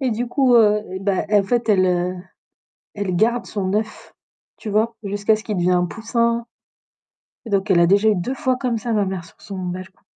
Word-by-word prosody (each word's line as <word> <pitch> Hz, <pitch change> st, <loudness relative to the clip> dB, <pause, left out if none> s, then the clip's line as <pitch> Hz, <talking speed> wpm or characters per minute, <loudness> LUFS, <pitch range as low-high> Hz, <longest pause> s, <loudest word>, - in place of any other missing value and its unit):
et 260 Hz, -3 st, 0 dB
du 235 Hz, +3 st, -2 dB
coup, 255 Hz, 0 st, +2 dB
heu 210 Hz, -2 st, +4 dB
et 190 Hz, -, -5 dB
ben 195 Hz, 0 st, 0 dB
en 205 Hz, -1 st, +4 dB
fait, 235 Hz, +3 st, -1 dB
elle, 190 Hz, -3 st, +4 dB
heu, 180 Hz, 0 st, 0 dB, 0.8 s
elle 200 Hz, -3 st, -2 dB
garde 235 Hz, +6 st, +1 dB
son 195 Hz, -2 st, -3 dB
œuf, 215 Hz, +1 st, -4 dB, 0.4 s
tu 215 Hz, -, -7 dB
vois, 220 Hz, +2 st, +1 dB
jusqu'à 205 Hz, +2 st, +1 dB
ce 215 Hz, -, -10 dB
qu'il 210 Hz, -3 st, -3 dB
devient 180 Hz, +1 st, +1 dB
un 180 Hz, 0 st, +3 dB
poussin 230 Hz, +3 st, -1 dB, 1.0 s
Et -, -, -7 dB
donc 200 Hz, 0 st, 0 dB
a 170 Hz, -2 st, +5 dB
déjà 200 Hz, +4 st, +4 dB
eu 210 Hz, -, +3 dB
2 240 Hz, +10 st, -2 dB
fois 260 Hz, -2 st, 0 dB
comme 245 Hz, -3 st, -1 dB
ça 230 Hz, +1 st, -3 dB
ma 210 Hz, -2 st, +2 dB
mère 190 Hz, -3 st, -4 dB
sur 165 Hz, -, -20 dB
son 195 Hz, -2 st, -8 dB
balcon. 185 Hz, +1 st, -7 dB
210 Hz, 215 wpm, -21 LUFS, 185-230 Hz, 1.0 s, a